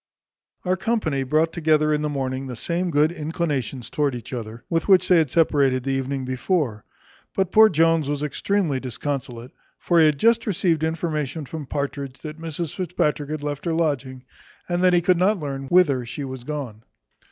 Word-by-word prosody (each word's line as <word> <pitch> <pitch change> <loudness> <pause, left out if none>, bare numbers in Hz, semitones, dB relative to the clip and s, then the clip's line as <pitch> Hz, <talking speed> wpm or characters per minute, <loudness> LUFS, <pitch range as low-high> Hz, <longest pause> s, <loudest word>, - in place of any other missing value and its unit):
Our 185 +1 +1
company 185 -10 0
brought 155 +5 +1
together 155 -2 +2
in 150 - 0
the 150 - -1
morning 135 -1 -3
the 125 - -6
same 175 +8 -2
good 155 0 +3
inclinations 150 -7 -3
towards 145 -4 0
each 120 +2 -10
other, 115 0 -6
with 165 -1 -1
which 185 -2 +5
they 180 - +5
had 155 -4 +1
separated 140 -5 +2
the 135 - -1
evening 135 0 -2
before; 130 - -1 0.5
but 190 -2 0
poor 220 0 +7
Jones 165 -3 +2
was 145 0 -2
extremely 155 -1 0
disconsolate; 130 -1 -5 0.3
for 170 -1 +2
he 160 - +7
had 150 -2 +1
just 230 +6 +3
received 170 -5 +1
information 160 -2 -2
from 150 0 -7
Partridge, 140 -1 -4
that 155 +1 -8
Mrs 165 0 -4
Fitzpatrick 150 -5 -1
had 155 -1 -4
left 145 +1 -4
her 170 - 0
lodging, 135 -6 -1 0.4
and 175 0 -1
that 180 -1 +5
he 175 - +4
could 180 -1 +3
not 200 +4 +3
learn 135 -4 -5
whither 145 -7 +4
she 140 +4 -5
was 130 -2 -6
gone. 130 -7 -5
150 Hz, 185 wpm, -23 LUFS, 135-170 Hz, 0.5 s, poor